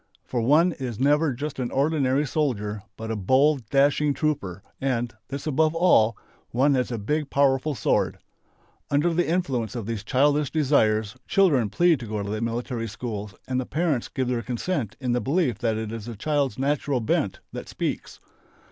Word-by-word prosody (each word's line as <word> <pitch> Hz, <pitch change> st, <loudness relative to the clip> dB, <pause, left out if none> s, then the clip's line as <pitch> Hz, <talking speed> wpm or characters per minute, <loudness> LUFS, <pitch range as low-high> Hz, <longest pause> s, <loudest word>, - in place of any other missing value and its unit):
For 120 Hz, -, -2 dB
one 155 Hz, +9 st, +4 dB
is 125 Hz, -8 st, -5 dB
never 145 Hz, +3 st, +3 dB
just 140 Hz, +3 st, -5 dB
an 125 Hz, -2 st, -1 dB
ordinary 140 Hz, -1 st, +1 dB
soldier 110 Hz, -8 st, -1 dB, 0.2 s
but 110 Hz, 0 st, -5 dB
a -, -, -1 dB
bold, 130 Hz, +4 st, +2 dB
dashing 140 Hz, +1 st, +3 dB
trooper, 100 Hz, -, -2 dB, 0.2 s
and 120 Hz, -3 st, -1 dB
this 140 Hz, +1 st, -6 dB
above 155 Hz, +2 st, +2 dB
all! 115 Hz, -11 st, +4 dB, 0.3 s
one 135 Hz, +4 st, +3 dB
has 125 Hz, -2 st, 0 dB
a 120 Hz, -, -2 dB
big 145 Hz, +8 st, -2 dB
powerful 140 Hz, +1 st, +2 dB
sword. -, -, +1 dB, 0.7 s
Under 150 Hz, +4 st, +2 dB
the 175 Hz, +1 st, +1 dB
influence 130 Hz, -, -1 dB
of 115 Hz, -4 st, -4 dB
these 110 Hz, -2 st, -4 dB
childish 145 Hz, +4 st, +2 dB
desires 110 Hz, -9 st, +2 dB
children 145 Hz, -, +3 dB
plead 175 Hz, -, +3 dB
to 120 Hz, -, -7 dB
go 105 Hz, -1 st, -3 dB
to 100 Hz, -, -5 dB
the 110 Hz, +1 st, -3 dB
military 115 Hz, 0 st, -2 dB
schools 105 Hz, -2 st, -6 dB
and 130 Hz, 0 st, 0 dB
the -, -, -5 dB
parents 155 Hz, -5 st, 0 dB
give 130 Hz, -2 st, -2 dB
their 125 Hz, -1 st, 0 dB
consent 125 Hz, -, -3 dB
in 125 Hz, -3 st, -1 dB
the 120 Hz, 0 st, +1 dB
belief 135 Hz, -, 0 dB
that 115 Hz, -3 st, 0 dB
it 110 Hz, -1 st, -4 dB
is 115 Hz, -2 st, -6 dB
the 120 Hz, -, -6 dB
children's 140 Hz, 0 st, 0 dB
natural 140 Hz, 0 st, 0 dB
bent 110 Hz, -, 0 dB
that -, -, -7 dB
speaks. -, -, -4 dB
130 Hz, 180 wpm, -25 LUFS, 115-150 Hz, 0.7 s, one